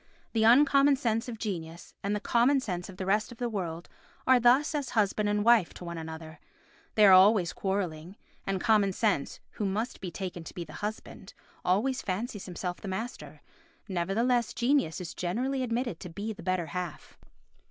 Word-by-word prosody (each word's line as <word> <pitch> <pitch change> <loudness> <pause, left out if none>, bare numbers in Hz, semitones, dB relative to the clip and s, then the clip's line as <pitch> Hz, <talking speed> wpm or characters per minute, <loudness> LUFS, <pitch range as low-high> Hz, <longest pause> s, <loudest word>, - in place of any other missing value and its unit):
The 225 -1 +2
uncommon 275 +3 +6
sense 230 -3 -1
of 230 - -6
genius 170 -6 -6
and 200 +1 0
the - - -1
common 245 +6 +3
sense 180 -8 -4
of 185 - -11
the 190 - -4
rest 210 +4 +1
of 240 - -11
the 245 - -2
world 175 -5 -4 0.4
are 260 -1 +6
thus 250 +6 +4
as 290 -3 -2
husband 210 0 +2
and 205 0 0
wife 235 -7 +4
to 180 - -9
one 170 -1 -5
another; 160 0 -8 0.6
they 215 - +6
are 195 - +8
always 185 -1 +6
quarrelling, 185 -3 -3 0.3
and 195 -1 0
common 210 -3 +3
sense, 200 -9 0
who 210 - -3
must 215 +5 -3
be 185 - -4
taken 180 -1 -6
to - - -10
be 175 - -4
the - - -12
husband, 210 +1 -6 0.3
always 225 +9 +1
fancies 205 +1 -4
himself 180 0 -5
the 205 - -7
master—nevertheless 230 - -3
genius 240 - +1
is 180 -2 -6
generally 250 +10 -2
admitted 240 -6 -2
to 180 - -8
be 205 +6 -5
the 200 - -12
better 185 -1 -1
half. 175 +1 -6
205 Hz, 180 wpm, -29 LUFS, 180-240 Hz, 0.6 s, are